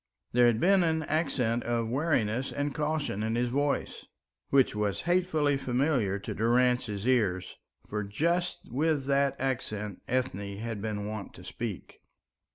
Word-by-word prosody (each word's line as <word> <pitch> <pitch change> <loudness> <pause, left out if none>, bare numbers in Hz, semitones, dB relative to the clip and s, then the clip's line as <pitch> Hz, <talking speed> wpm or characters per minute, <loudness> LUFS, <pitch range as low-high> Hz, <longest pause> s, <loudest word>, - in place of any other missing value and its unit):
There 120 0 +5
had 115 -2 +2
been 190 +4 +5
an 160 -2 +1
accent 130 -7 0
of 115 -1 0
wariness 130 -3 0
and 145 0 -2
caution 150 -8 -1
in 110 +1 -1
his 120 +1 +1
voice, 145 +2 -1 0.4
which 135 -2 +4
was 105 -1 -1
hatefully 170 -5 +2
familiar 125 -6 +1
to 100 - -5
Durrance's 120 -2 +1
ears, 95 -8 +1 0.3
for 105 0 -2
just 170 - 0
with 145 +1 +1
that 140 0 +2
accent 105 -6 -3
Ethne 100 -6 -2
had 110 -1 -4
been 105 -1 -3
wont 105 -1 -6
to 90 - -12
speak. 105 0 -6
125 Hz, 145 wpm, -29 LUFS, 105-145 Hz, 0.4 s, There